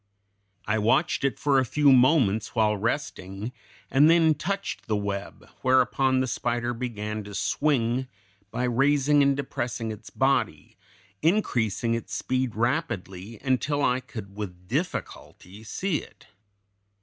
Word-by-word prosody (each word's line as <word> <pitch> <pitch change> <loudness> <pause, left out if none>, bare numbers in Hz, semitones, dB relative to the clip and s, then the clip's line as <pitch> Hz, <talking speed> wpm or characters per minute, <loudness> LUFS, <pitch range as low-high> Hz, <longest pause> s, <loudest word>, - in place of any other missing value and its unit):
I 110 +2 +1
watched 110 +5 +2
it 135 - 0
for 140 -2 +3
a - - +3
few 140 +3 +3
moments 125 -6 +3
while 110 -2 +3
resting, 105 -2 -3 0.4
and 145 +4 +6
then 165 -1 +5
touched 195 +7 -4
the 110 - +1
web, 100 -1 -5
whereupon 130 0 +3
the 130 - -1
spider 120 0 -1
began 110 -3 -4
to 100 0 -8
swing, 130 -3 0 0.4
by 120 +4 -3
raising 140 +4 +3
and 140 -1 +3
depressing 120 -4 -3
its 105 0 -9
body, 135 +1 0 0.5
increasing 120 - +1
its 115 - -4
speed 130 -2 -1
rapidly, 110 - -2
until 140 +2 0
I 125 -1 +2
could 105 -6 -9
with 90 -3 -7
difficulty 110 - -5
see 180 - -1
it. - - -12
125 Hz, 130 wpm, -26 LUFS, 105-140 Hz, 0.5 s, and